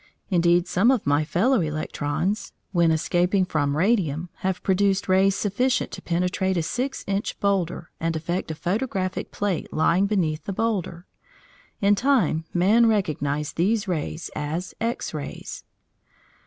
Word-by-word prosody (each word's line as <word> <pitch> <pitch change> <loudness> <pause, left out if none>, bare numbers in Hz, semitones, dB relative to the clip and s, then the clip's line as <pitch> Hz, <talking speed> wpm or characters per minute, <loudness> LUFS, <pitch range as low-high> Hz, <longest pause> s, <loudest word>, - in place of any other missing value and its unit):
Indeed, 175 0 +3
some 190 +6 +3
of 260 -5 +2
my 145 +2 +3
fellow 210 - +2
electrons, 155 +5 -2 0.2
when 170 -3 +3
escaping 175 +4 +2
from 145 -4 0
radium, 175 -4 +1
have 185 -1 -2
produced 195 0 +2
rays 190 +1 +4
sufficient 245 +6 0
to - - -7
penetrate 180 +2 0
a 165 - +1
six 255 - -3
inch 200 +1 -2
boulder 180 -4 -1
and 165 0 -1
affect 170 +3 -2
a 160 - -3
photographic 185 - -2
plate 200 -5 -2
lying 170 +5 +2
beneath 165 -7 0
the 200 - -3
boulder. 185 -5 -2 0.8
In 200 0 +5
time 215 - +2
man 210 +7 +4
recognised 150 -8 -1
these 205 +5 +1
rays 165 -1 -3
as 160 +5 -3
X 230 -5 -2
rays. 150 -2 -6
180 Hz, 140 wpm, -24 LUFS, 165-200 Hz, 0.8 s, In